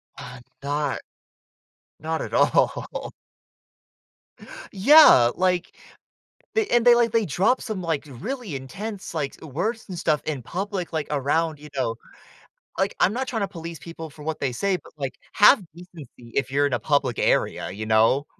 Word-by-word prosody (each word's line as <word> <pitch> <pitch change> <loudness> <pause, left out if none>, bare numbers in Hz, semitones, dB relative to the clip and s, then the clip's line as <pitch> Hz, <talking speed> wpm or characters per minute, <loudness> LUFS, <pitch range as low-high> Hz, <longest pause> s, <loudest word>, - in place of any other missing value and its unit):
Uh, 125 0 -10 0.2
not, 145 0 -2 1.0
not 160 +1 -3
at - - -6
all. - - +1 1.6
Yeah, 200 - +7
like, 180 -1 0 0.8
they 440 -1 +2
and 240 0 +2
they 240 - +9
like 235 -2 +2
they 225 -2 +2
dropped 190 - +1
some 215 -6 -4
like 160 -4 -2
really 200 - -5
intense, 195 - -7
like, 145 -4 -2
s 160 - -9
words 220 - -2
and 180 -2 -6
stuff 155 -3 +1
in 145 -5 -3
public, 185 - -4
like 155 -2 -2
around, 150 +2 0
you 150 +1 -12
know 115 -4 -1 0.8
like, - - 0
I'm 200 - +3
not 260 +2 -2
trying 230 -3 -3
to 200 - -1
police 165 -3 -8
people 165 +2 -9
for 150 +1 -13
what 160 +1 -3
they 130 -3 -1
say, 195 +9 0
but - - -16
like, 135 -2 -4 0.2
have 205 -2 +6
decency 170 -6 -12 0.3
if 135 -1 0
you're 145 +1 +2
in 140 - -1
a - - +1
public 140 -5 0
area, - - +1
you 110 +3 -6
know. 110 +6 +3
160 Hz, 165 wpm, -24 LUFS, 140-200 Hz, 1.6 s, they